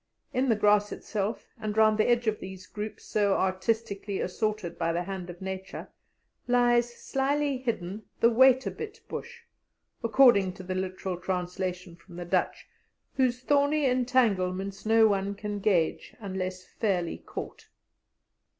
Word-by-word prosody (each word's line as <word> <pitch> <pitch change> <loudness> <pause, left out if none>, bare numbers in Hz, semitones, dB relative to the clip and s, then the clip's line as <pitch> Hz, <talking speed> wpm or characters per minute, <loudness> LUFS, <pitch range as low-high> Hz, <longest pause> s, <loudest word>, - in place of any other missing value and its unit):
In 260 +1 +1
the 225 - +4
grass 210 0 +3
itself, 210 +1 -4
and 215 0 -4
round 215 0 +5
the 215 - +3
edge 240 0 +3
of 215 -1 0
these 190 0 -9
groups 210 +2 -7
so 205 -2 +2
artistically 200 +1 -1
assorted 200 -2 -2
by 165 -1 +1
the 170 +1 -1
hand 185 -1 -6
of 175 +2 -9
Nature, 190 0 -6 0.6
lies 240 -1 +3
slyly 275 +2 -1
hidden 215 -5 -3
the 235 - +5
"wait 260 +2 +5
a - - -1
bit" 435 - -8
bush, 475 0 -7 0.6
according 225 -5 +5
to 185 - -10
the 185 0 -3
literal 185 0 -3
translation 180 0 -3
from 175 +1 -16
the 175 0 -6
Dutch, 175 - -1 0.5
whose 250 -2 +1
thorny 285 +2 +2
entanglements 200 -7 +1
no 225 0 +6
one 200 -1 0
can 205 0 -4
gauge 185 -6 0
unless 185 -3 -4
fairly 185 -6 -1
caught. - - -8
205 Hz, 145 wpm, -28 LUFS, 185-240 Hz, 0.6 s, no